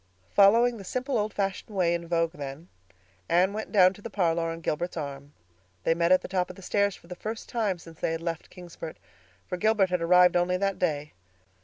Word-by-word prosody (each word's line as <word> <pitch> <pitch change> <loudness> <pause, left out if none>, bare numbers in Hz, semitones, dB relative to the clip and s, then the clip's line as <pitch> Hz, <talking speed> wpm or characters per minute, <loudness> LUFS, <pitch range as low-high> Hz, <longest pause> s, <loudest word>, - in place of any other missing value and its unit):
Following 230 +4 +5
the 200 - -9
simple, 255 +7 -3
old 215 -1 0
fashioned 200 +1 -3
way 175 -3 +2
in 170 0 -3
vogue 165 -1 +1
then, 145 +2 -8 0.6
Anne 180 +4 +3
went 215 +1 -5
down 185 -3 +6
to 205 - -15
the 230 - -6
parlor 170 -5 0
on 165 0 -6
Gilbert's 170 +3 -2
arm. 140 -1 -6 0.5
They - - +3
met 170 +1 +1
at 185 - +5
the - - -5
top 185 -1 -1
of 185 - -9
the 195 - -13
stairs 200 +1 +1
for - - -18
the 180 - -7
first 220 +4 -6
time 215 -6 -1
since 165 -1 -14
they - - 0
had 165 - -4
left 165 -2 -4
Kingsport, 170 -3 -9 0.5
for 180 - -4
Gilbert 210 -2 +2
had 180 -1 0
arrived 180 +1 +5
only 175 +1 +2
that 195 0 -1
day. 150 -3 -1
180 Hz, 215 wpm, -27 LUFS, 165-200 Hz, 0.6 s, down